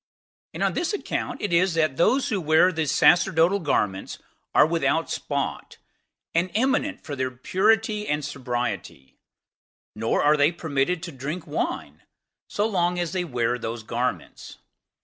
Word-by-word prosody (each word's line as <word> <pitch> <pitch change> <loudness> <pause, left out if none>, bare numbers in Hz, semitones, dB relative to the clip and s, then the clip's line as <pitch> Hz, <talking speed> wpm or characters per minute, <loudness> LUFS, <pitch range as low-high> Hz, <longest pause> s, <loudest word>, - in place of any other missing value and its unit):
And - - -2
on - - +1
this 350 +4 -1
account 410 - -3
it 205 - -1
is 175 0 +3
that 155 -4 +1
those 255 - +2
who 205 -6 -1
wear 160 +3 +4
the 160 -3 -2
sacerdotal 170 +5 +4
garments 105 - -1 0.4
are - - +7
without 160 -1 0
spot, 140 -1 -3 0.6
and 170 +2 +1
eminent 270 +5 0
for 145 - -5
their 130 -1 -1
purity 210 - +1
and 150 -1 -1
sobriety: 120 - -5 0.7
nor 115 +2 0
are 150 +1 +4
they 145 +2 +4
permitted 160 +1 -1
to 175 - -5
drink 150 +5 -5
wine 75 +1 -4 0.5
so 205 - -1
long 180 -4 0
as 175 -2 -2
they 185 -1 0
wear 125 -5 -1
those 115 0 -5
garments. 115 - -4
160 Hz, 150 wpm, -24 LUFS, 130-185 Hz, 0.7 s, are